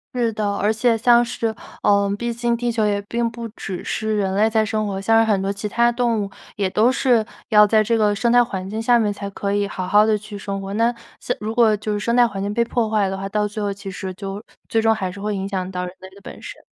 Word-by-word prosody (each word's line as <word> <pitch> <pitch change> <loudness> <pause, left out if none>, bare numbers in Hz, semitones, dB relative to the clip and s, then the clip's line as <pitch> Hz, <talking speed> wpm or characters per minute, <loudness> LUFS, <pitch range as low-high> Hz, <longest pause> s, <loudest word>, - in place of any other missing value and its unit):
是 235 -2 0
的， 205 -1 -1
而 205 +2 +1
且 230 +1 +2
像 240 +1 +5
是， 230 -2 -2 0.3
呃， 200 -1 +3
毕 235 +2 -2
竟 235 0 0
地 240 0 -1
球 225 -1 0
也 205 -1 +1
并 235 +3 -1
不 230 0 -7
只 195 -4 -7
是 220 -1 -2
人 195 -2 0
类 210 +3 +3
在 220 -1 +2
生 215 -1 -1
活， 195 -1 -3
像 225 +3 +3
是 220 - +1
很 200 - +2
多 195 +1 -1
其 205 +1 -5
他 235 +2 +3
动 235 -2 0
物 195 - -7 0.2
也 200 -2 0
都 215 +6 +3
是 250 -4 +2 0.3
要 210 -1 +6
在 215 +1 +4
这 230 +2 +1
个 210 -2 +2
生 235 +3 +1
态 245 0 +6
环 190 -5 -5
境 215 +3 -4
下 240 +1 +4
面 210 -3 +1
才 200 0 -6
可 200 0 -3
以 205 0 +1
好 185 -2 -5
好 210 +3 +5
地 215 -1 +3
去 210 0 -10
生 200 0 -4
活。 195 0 -6
那 230 +3 +2 0.3
像 245 - -2
如 215 +1 -4
果 225 -3 +4
就 210 +1 -3
是 205 - -1
生 235 +3 0
态 245 -1 +5
环 200 -3 -6
境 200 +1 -2
被 235 +2 +1
破 235 -1 -1
坏 210 -2 +2
的 190 - -3
话， 195 0 -4
到 210 +1 0
最 210 +1 -6
后 205 -1 -1
其 200 0 -7
实 190 0 -5
就 195 +2 -6 0.2
最 225 - +1
终 225 0 +4
还 190 -4 -3
是 200 +2 -10
会 210 0 -2
影 195 0 -3
响 185 -2 -3
到 180 -1 -3
人 180 - -7
类 190 - -11
的 200 - -15
本 - - -10
身。 - - -9
210 Hz, 305 characters per minute, -21 LUFS, 200-230 Hz, 0.3 s, 要